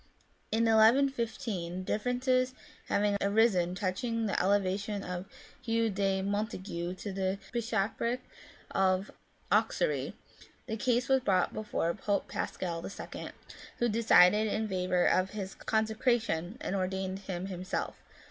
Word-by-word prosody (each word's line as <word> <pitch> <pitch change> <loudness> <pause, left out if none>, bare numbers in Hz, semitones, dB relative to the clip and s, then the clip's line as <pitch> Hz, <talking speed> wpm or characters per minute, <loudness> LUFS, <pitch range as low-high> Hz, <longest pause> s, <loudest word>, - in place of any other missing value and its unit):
In 225 +1 +2
1 225 -1 +4 0.2
1 275 -1 +2
IS, 230 -1 -2 0.5
differences 255 +4 +1 0.3
having 205 0 +2
arisen 200 -4 +3
touching 225 +5 -1
the 200 - +1
elevation 200 +1 0
of 180 +1 -5 0.3
Hugh 230 -2 +1
de 195 -1 0
Montaigu 190 -4 -3
to 200 +1 -6
the 190 0 -1 0.2
Bishopric 230 +1 0 0.5
of 190 +1 +1 0.4
Auxerre, - - +1 0.5
the 220 - -3
case 245 +2 +1
was 265 0 +4
brought 195 -7 +1
before 210 -5 -1
Pope 205 +1 -1
Pascal 170 -2 -3 0.3
n., - - -6 0.5
who 240 - +2
decided 215 -2 +5
in 215 +1 -1
favour 180 -2 +1
of 185 +1 +3
his 195 -1 -4
consecration, 220 -4 0
and 195 - -2
ordained 190 0 -2
him 190 -2 -5
himself. 185 -1 -3
205 Hz, 125 wpm, -31 LUFS, 185-230 Hz, 0.5 s, decided